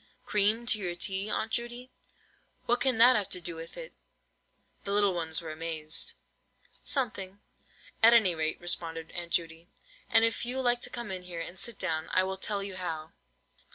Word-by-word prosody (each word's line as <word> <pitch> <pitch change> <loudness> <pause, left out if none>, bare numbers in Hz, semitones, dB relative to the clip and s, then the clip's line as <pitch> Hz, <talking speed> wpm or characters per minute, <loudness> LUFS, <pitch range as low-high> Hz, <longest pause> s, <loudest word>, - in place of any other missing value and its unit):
"Cream 210 +3 +3
to 225 -3 +5
your 175 -3 -3
tea, 195 +3 -2
Aunt 220 +1 -1
Judy? 240 +1 -3 0.7
What 240 +1 +2
can 260 -4 +2
that 245 +3 +8
have 205 -4 0
to 180 - -4
do 170 -1 -4
with 165 0 -9
it?" - - -8 0.9
The 200 - -4
little 205 -2 +4
ones 165 -1 -2
were 160 - -5
amazed. 160 0 -2 0.7
"Something," 205 -8 -1 0.6
at 225 +1 +9
any 220 -7 +5
rate, 160 -1 -1
responded 165 -2 -2
Aunt 170 -1 -6
Judy; 165 0 -1 0.4
"and 225 0 +6
if 230 - -1
you 250 +2 -2
like 245 -1 +2
to - - -1
come 235 -4 -6
in 185 -1 -4
here, 175 -2 -7
and 175 +2 -6
sit 235 -3 0
down, 160 -3 -2
I 185 - +4
will 190 0 -3
tell 200 +1 -2
you 195 -2 -6
how." 160 -4 -4
190 Hz, 185 wpm, -30 LUFS, 165-230 Hz, 0.9 s, at